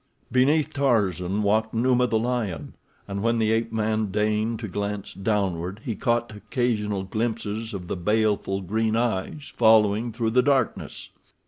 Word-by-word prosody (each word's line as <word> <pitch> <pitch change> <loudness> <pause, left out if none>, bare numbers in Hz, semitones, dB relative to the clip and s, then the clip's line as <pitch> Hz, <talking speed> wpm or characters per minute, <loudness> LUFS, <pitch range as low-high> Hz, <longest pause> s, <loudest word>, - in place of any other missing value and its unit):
Beneath 140 +5 +3
Tarzan 105 - +1
walked 110 +2 +1
Numa, 125 +1 +3
the 110 - +1
lion, 110 - -2 0.3
and 100 0 -4
when 115 +2 +1
the 110 -1 +2
ape 115 0 0
man 110 -1 0
deigned 105 +3 0
to 110 - -4
glance 100 +1 -4
downward 95 -2 -1
he 115 - -1
caught 120 -2 -1
occasional 105 -3 -1
glimpses 110 +1 -3
of 95 -4 -6
the - - -2
baleful 105 0 0
green 110 +4 0
eyes 120 +5 -2
following 110 0 +4
through 115 0 -1
the 125 +2 +4
darkness. 135 0 -1
110 Hz, 145 wpm, -25 LUFS, 100-115 Hz, 0.3 s, following